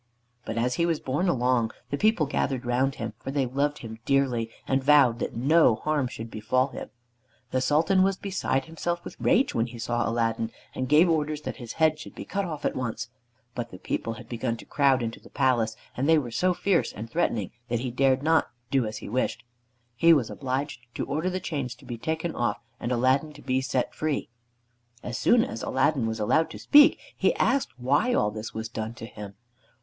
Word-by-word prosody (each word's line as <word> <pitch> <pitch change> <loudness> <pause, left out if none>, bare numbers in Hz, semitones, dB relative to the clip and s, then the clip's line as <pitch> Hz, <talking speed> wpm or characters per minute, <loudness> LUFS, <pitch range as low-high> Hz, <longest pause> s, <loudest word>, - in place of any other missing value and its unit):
But 110 - -4
as 125 +2 +1
he - - +4
was 165 -2 0
borne 160 +8 0
along, 125 -5 +1 0.2
the - - +1
people 215 -5 +3
gathered 135 -2 -1
around 130 +3 +1
him, 115 -2 -5
for - - -7
they 135 -1 +1
loved 140 +4 0
him 110 0 -8
dearly, 125 -4 +1 0.2
and 135 0 +1
vowed 135 -5 +5
that - - -3
no 135 0 +4
harm 150 +1 0
should 115 -2 -8
befall 130 +5 +1
him. - - -7 0.6
The 130 - +1
Sultan 165 +8 +3
was 195 0 +2
beside 185 -10 -1
himself 170 +2 -3
with - - -8
rage 260 - +3
when 115 +1 +1
he 120 0 -10
saw 120 0 -1
Aladdin, 115 -1 0 0.2
and 130 -1 -3
gave 155 +4 +6
orders 155 -2 0
that - - -5
his 120 -4 -7
head 155 -1 +2
should - - -10
be - - -7
cut 200 0 -2
off 155 -4 -5
at - - 0
once. 120 -2 -3 0.4
But 120 -1 -4
the 90 - -10
people 115 +4 -3
had 115 +1 -11
begun 115 0 -2
to - - -12
crowd 135 -3 +2
into 115 0 -4
the - - -16
palace, 115 -4 +1 0.2
and 135 +5 0
they 160 - +6
were 125 -6 -2
so 180 +8 +1
fierce 195 -2 +1
and 110 +2 -7
threatening 115 - -1 0.2
that 120 -1 0
he 125 -1 -3
dared 130 +2 +2
not 160 -4 +3 0.2
do 130 -5 +2
as 110 0 -5
he - - -8
wished. 125 +5 -1 0.5
He 165 +7 +6
was 135 -8 +1
obliged 135 +1 -3 0.2
to - - -2
order 160 +5 -1
the 185 0 -2
chains 140 -9 -3
to 125 - -18
be 120 -2 -6
taken 160 +4 -2
off, 120 - -1 0.2
and 120 - -3
Aladdin 130 +5 +2
to 145 - -13
be 130 +1 +1
set 130 -1 -1
free. 155 -2 -2 0.7
As 120 - -4
soon 235 -1 +4
as 115 - -6
Aladdin 135 -2 +1
was 110 0 -3
allowed 155 +10 +2
to - - -8
speak 290 0 +6 0.2
he - - +2
asked 270 0 +2
why 145 - +2
all 105 - +2
this 110 +1 -6
was 110 0 -4
done 110 0 -5
to 115 - -8
him. 105 -2 -9
130 Hz, 215 wpm, -27 LUFS, 115-155 Hz, 0.7 s, gave